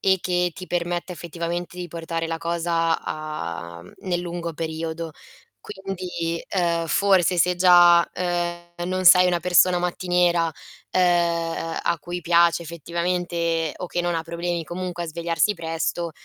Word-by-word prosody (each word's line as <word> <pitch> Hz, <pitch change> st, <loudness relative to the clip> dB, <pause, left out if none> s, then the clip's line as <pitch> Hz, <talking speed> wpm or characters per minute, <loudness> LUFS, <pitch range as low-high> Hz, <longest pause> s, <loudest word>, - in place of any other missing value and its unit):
e 190 Hz, 0 st, +3 dB
che 180 Hz, 0 st, 0 dB
ti 185 Hz, +3 st, -9 dB
permetta, 175 Hz, +1 st, -2 dB
effettivamente, 170 Hz, +1 st, -5 dB
di 180 Hz, -, -4 dB
portare 165 Hz, 0 st, -4 dB
la 165 Hz, 0 st, -3 dB
cosa 170 Hz, 0 st, 0 dB
a 85 Hz, -, -6 dB
mhmm, 90 Hz, -, -15 dB, 0.2 s
nel 175 Hz, -1 st, +1 dB
lungo 170 Hz, -1 st, -4 dB
periodo. 160 Hz, 0 st, -4 dB, 0.5 s
Quindi, 180 Hz, -4 st, -4 dB
ehm, 170 Hz, -3 st, 0 dB
forse 190 Hz, -2 st, +3 dB
se 180 Hz, +2 st, +3 dB
già, 175 Hz, -1 st, +7 dB
ehm, 175 Hz, -1 st, -2 dB, 0.3 s
non 185 Hz, 0 st, -1 dB
sei 180 Hz, 0 st, +8 dB
una 175 Hz, -1 st, +1 dB
persona 180 Hz, 0 st, +4 dB
mattiniera, 175 Hz, -1 st, +1 dB, 0.4 s
ehm, 170 Hz, -2 st, +1 dB
a 170 Hz, -, 0 dB
cui 175 Hz, +3 st, -5 dB
piace 170 Hz, 0 st, +3 dB
effettivamente 170 Hz, 0 st, -2 dB
o 180 Hz, -, -5 dB
che 175 Hz, -, -2 dB
non 175 Hz, -1 st, -1 dB
ha 165 Hz, -, -2 dB
problemi 170 Hz, 0 st, -3 dB
comunque 175 Hz, +1 st, -4 dB
a -, -, -6 dB
svegliarsi 170 Hz, +5 st, 0 dB
presto, 165 Hz, 0 st, -3 dB
170 Hz, 145 wpm, -23 LUFS, 165-180 Hz, 0.5 s, sei